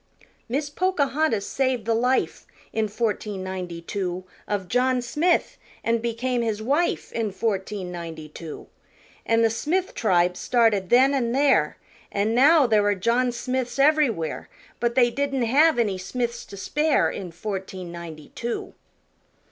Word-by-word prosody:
Miss 285 +4 -2
Pocahontas 295 - +1
saved 260 -5 -1
the 230 - +2
life 250 +3 0 0.3
In 220 -1 +1
fourteen 210 -2 -2
ninety 180 -3 -5
two 185 -1 -3 0.2
Of 200 -3 -2
John 250 +4 +2
Smith, 335 - 0 0.2
an' 230 0 +1
became 235 +2 -1
his 220 -2 -1
wife 285 +10 0
In 225 -3 -2
fourteen 195 -2 -2
ninety 165 -3 -7
two. 155 +1 -9 0.6
An' 230 0 +3
the 225 - +3
Smith 340 +11 -1
tribe 180 -4 +2
started 220 -5 +2
then 260 +3 +5
an' 240 -4 0
there, 265 - +3 0.3
An' 205 +2 0
now 285 +4 +6
there 215 -3 +3
are 205 0 +2
John 235 +6 +1
Smiths 250 +1 -3
ev'rywhere, 275 - +2 0.3
But 235 0 0
they 240 -2 +4
didn't 275 -1 -1
have 295 +7 +4
any 205 -5 +1
Smiths 235 +5 -3
to 200 - -11
spare 300 +9 +1
In 185 -3 -6
fourteen 185 0 -6
ninety 165 -3 -9
two. 235 0 -4
230 Hz, 145 wpm, -24 LUFS, 190-260 Hz, 0.6 s, now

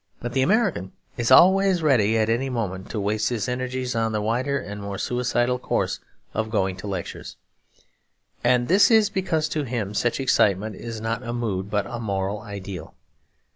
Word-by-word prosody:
But 120 0 -5
the 130 - +2
American 190 - +1 0.2
is 120 -1 -1
always 190 -1 +6
ready, 115 -7 +3
at 110 -1 +2
any 120 +4 0
moment, 100 -6 -3
to 110 - -3
waste 105 +2 0
his 115 -3 -2
energies 130 0 -2
on 115 -1 0
the 105 - 0
wilder 125 +6 0
and 105 -5 -6
more 100 -1 -5
suicidal 125 +1 0
course - - -1 0.3
of 110 0 -2
going 95 -4 0
to 95 - -7
lectures. 95 -4 -6 1.1
And 120 0 +3
this 195 +4 +5
is 220 -3 +4
because 170 -6 0
to 155 - -1
him 115 -7 -3
such 120 +4 0
excitement 105 -5 +2
is 115 +1 -6
not 115 +1 -2
a 120 -2 -5
mood 100 -5 -2
but 105 -1 0
a 120 0 -6
moral 100 -2 -2
ideal. 100 -5 -8
115 Hz, 175 wpm, -24 LUFS, 105-130 Hz, 1.1 s, always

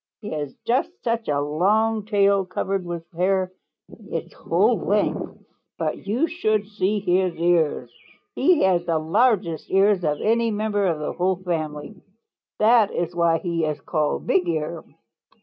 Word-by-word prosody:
He 210 - -7
has 145 -3 -4
just 250 +3 +1
such 230 -1 -1
a 145 -1 +1
long 205 +9 +1
tail 200 -2 +3
covered 190 +1 -2
with 170 -1 -5
hair 185 +1 0 0.6
its - - -5
whole - - +1
length. - - -1 0.3
But - - -3
you 235 +10 +1
should 215 - 0
see 205 0 -1
his 185 -2 +1
ears. 165 -7 +1 0.4
He 325 +3 +3
has 180 -2 +3
the 165 -1 +1
largest 170 0 +1
ears 195 -1 +3
of 150 -2 0
any 230 +1 +2
member 205 -2 0
of 165 -3 0
the 150 - -4
whole 185 +1 +1
family. 165 0 -5 0.6
That 220 -1 +5
is 175 0 -3
why 170 -1 +3
he 170 -1 -2
is 155 -1 -1
called 155 -3 -1
Bigear. 170 -3 0
185 Hz, 150 wpm, -23 LUFS, 165-210 Hz, 0.6 s, That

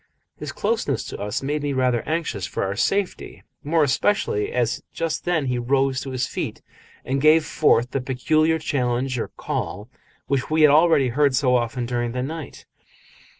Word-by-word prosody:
His - - -6
closeness - - -1
to - - -7
us 105 +7 -3
made 145 +2 -1
me 145 -1 -1
rather 125 -3 +1
anxious 150 - -2
for - - -3
our 100 0 -2
safety, 195 - -1 0.2
more 160 +2 +2
especially 310 - +1
as - - 0
just 165 -1 -3
then 160 -5 +1
he 125 -1 -1
rose 135 +1 +1
to 135 - -6
his 130 -1 -1
feet - - -5 0.4
and 135 +1 -1
gave 155 +1 +5
forth 125 -7 +2
the 135 - -1
peculiar 155 +5 +1
challenge 125 -4 -1
or - - -2
call 105 +5 -5 0.4
which 135 -2 -1
we 155 0 +3
had 150 - +7
already 155 -4 +4
heard 140 +2 +2
so 125 -1 +3
often 120 0 -1
during 120 -1 -2
the 125 0 -2
night. 155 +1 -7
135 Hz, 175 wpm, -23 LUFS, 125-155 Hz, 0.4 s, had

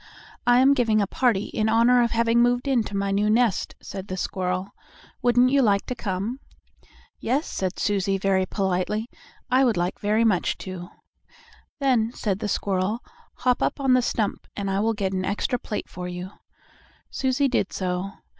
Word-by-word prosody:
"I 245 0 +6
am 275 +2 +6
giving 230 -5 +2
a 205 - +2
party 220 -1 0
in 220 0 0
honor 235 +2 +5
of 235 - +2
having 230 0 +2
moved 245 +2 +2
into 230 -7 0
my 200 0 0
new 205 +2 +2
nest," 225 -2 +1
said 195 0 -7
the 185 - -4
squirrel. 185 +1 -2 0.5
"Wouldn't 245 0 +4
you 280 0 +4
like 200 -5 +2
to - - -3
come?" 210 +2 -3 0.8
"Yes," 270 +7 0
said 190 -1 -3
Susie 195 -1 0
very 190 -1 +1
politely, 195 +4 -1 0.4
"I 260 +2 +5
would 235 -7 +2
like 175 +1 -1
very 215 +2 +2
much 200 -6 +1
to." 185 -2 -7 0.9
"Then," 245 -5 +2
said 200 -3 -1
the 210 - -2
squirrel, 200 +3 -1 0.3
"hop 250 -1 +1
up - - 0
on 270 -2 +3
the 255 - +5
stump, 220 -3 -2
and 200 -1 -2
I 195 - 0
will 225 +2 +1
get 195 -2 -2
an 185 0 -1
extra 210 +6 -1
plate 215 - -5
for 180 0 -7
you." 180 +1 -6 0.8
Susie 265 +1 +1
did 240 -6 0
so. 185 +1 -2
210 Hz, 175 wpm, -24 LUFS, 190-245 Hz, 0.9 s, I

